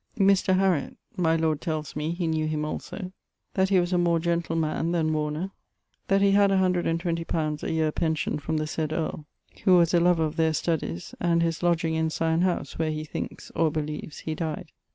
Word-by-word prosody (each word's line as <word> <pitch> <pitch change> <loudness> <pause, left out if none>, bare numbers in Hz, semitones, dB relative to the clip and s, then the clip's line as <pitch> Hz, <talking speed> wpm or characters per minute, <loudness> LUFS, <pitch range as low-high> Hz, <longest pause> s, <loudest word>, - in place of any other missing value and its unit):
Mr. 195 -2 +4
Harriott; 185 -6 +1 0.2
my 165 -2 +2
lord 160 -2 0
tells 155 -3 -3
me, 150 +1 -2
he 170 +1 -2
knew 160 -1 0
him 155 -1 -1
also: 185 +4 -5 0.4
that 190 0 +2
he 190 -2 +4
was 175 +1 0
a 180 - +3
more 170 -1 +3
gentile 170 0 -1
man, 160 +1 0
then 160 -2 +1
Warner. 155 +5 -2 0.6
That 195 0 +3
he 200 - +5
had 200 0 +5
120 175 -3 +1
li. - - -17
a 155 -2 -1
yeare 160 -1 +1
pention 160 -2 -1
from 160 +2 -1
the 155 - -1
said 155 0 -2
earle 155 -1 -3 0.4
(who 185 -3 +7
was 170 -1 +3
a 175 - +5
louer 175 0 +4
of 155 - -5
ther 160 -1 +3
studyes) 150 - -2
and 170 -1 +2
his 165 -1 -1
lodging 170 -2 +1
in 160 0 +1
Syon 160 +1 0
howse, 175 -7 -1
where 160 -1 +1
he 155 0 -3
thinks, 155 - -6
or 160 -2 +2
beliues, 150 0 -4
he 160 - -3
dyed. 155 -1 -4
165 Hz, 205 wpm, -26 LUFS, 155-175 Hz, 0.6 s, who